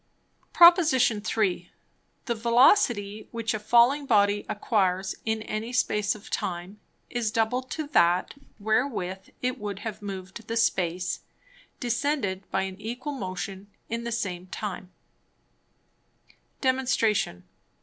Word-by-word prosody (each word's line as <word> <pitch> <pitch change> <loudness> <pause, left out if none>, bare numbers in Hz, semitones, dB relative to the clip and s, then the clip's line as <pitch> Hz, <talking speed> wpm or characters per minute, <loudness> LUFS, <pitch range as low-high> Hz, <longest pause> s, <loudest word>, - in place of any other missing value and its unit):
_ - - -44
Prop. 345 +1 +8
III. 220 - +1 0.5
The 240 - 0
Velocity 230 - +3
which 230 -1 -2
a 215 - -2
falling 240 +6 +4
Body 205 -3 +3
acquires 190 -3 0
in 220 -1 -1
any 215 +2 -4
Space 210 -5 +1
of 210 - -13
time, 180 +3 -4 0.3
is 240 -3 0
double 225 +3 +1
to 300 +4 -5
that, 175 - +3 0.2
wherewith 215 -4 -1
it 250 0 -1
would 205 -2 -4
have 215 -1 -5
moved 195 +2 -7
the 230 - -2
Space, 180 -5 0 0.6
descended 235 -6 -1
by 190 - 0
an 190 -1 -5
equable 250 +6 -5
Motion, 190 +1 -5 0.2
in 230 +1 -3
the 235 - -4
same 185 -5 -3
time. 190 -1 -6 1.7
_Demonstration. 245 - +1
215 Hz, 120 wpm, -27 LUFS, 190-240 Hz, 1.7 s, Prop